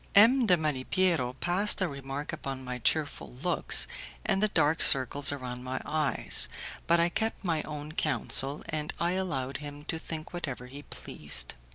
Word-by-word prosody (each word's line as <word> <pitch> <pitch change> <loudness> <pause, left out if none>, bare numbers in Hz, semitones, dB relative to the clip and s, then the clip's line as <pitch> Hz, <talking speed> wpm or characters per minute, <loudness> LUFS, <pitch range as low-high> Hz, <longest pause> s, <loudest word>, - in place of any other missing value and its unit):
M. 235 +4 +7
de 180 -3 +5
Malipiero 155 -1 0
passed 190 +4 +2
a 185 - +1
remark 140 0 -5
upon 135 -1 -5
my 125 -1 -5
cheerful 145 +4 0
looks 180 - +4 0.4
and 195 - +1
the 215 - +4
dark 160 -5 +2
circles 140 +2 +4
around 125 -3 -5
my 130 +1 -3
eyes, 155 -2 +4 0.4
but 170 0 +4
I 170 - +4
kept 220 +4 -2
my 165 -3 +1
own 150 0 -6
counsel, 145 -2 0
and 150 -1 -3
I 170 +1 +1
allowed 140 -9 -2
him 145 0 -9
to 160 - -3
think 160 0 -7
whatever 135 -8 -5
he 135 +3 -9
pleased. - - -4
150 Hz, 165 wpm, -29 LUFS, 135-175 Hz, 0.4 s, M